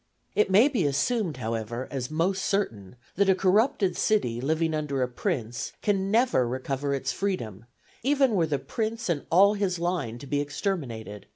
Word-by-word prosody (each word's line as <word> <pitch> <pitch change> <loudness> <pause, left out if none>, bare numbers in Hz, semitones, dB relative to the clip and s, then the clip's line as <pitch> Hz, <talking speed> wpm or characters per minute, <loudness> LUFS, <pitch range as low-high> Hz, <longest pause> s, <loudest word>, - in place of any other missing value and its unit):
It 210 - +2
may 205 +8 +6
be 230 - +1
assumed, 160 - 0
however, 115 +1 -3
as 130 -3 -3
most 180 +5 0
certain, 115 - -2 0.2
that 200 0 +3
a 190 - +5
corrupted 195 +1 +2
city 125 - +1
living 160 +3 0
under 145 -4 -1
a - - 0
prince 125 - -3
can 195 -2 +1
never 225 - +3
recover 135 +3 -2
its 135 0 -2
freedom, 115 - -3 0.4
even 275 0 +3
were 170 -5 +2
the 145 -2 0
prince 220 - -3
and 155 -4 -1
all 195 +5 +6
his 200 -3 -1
line 170 -9 -2
to 125 - -10
be 145 +1 0
exterminated. 140 - -4
160 Hz, 170 wpm, -27 LUFS, 130-200 Hz, 0.4 s, may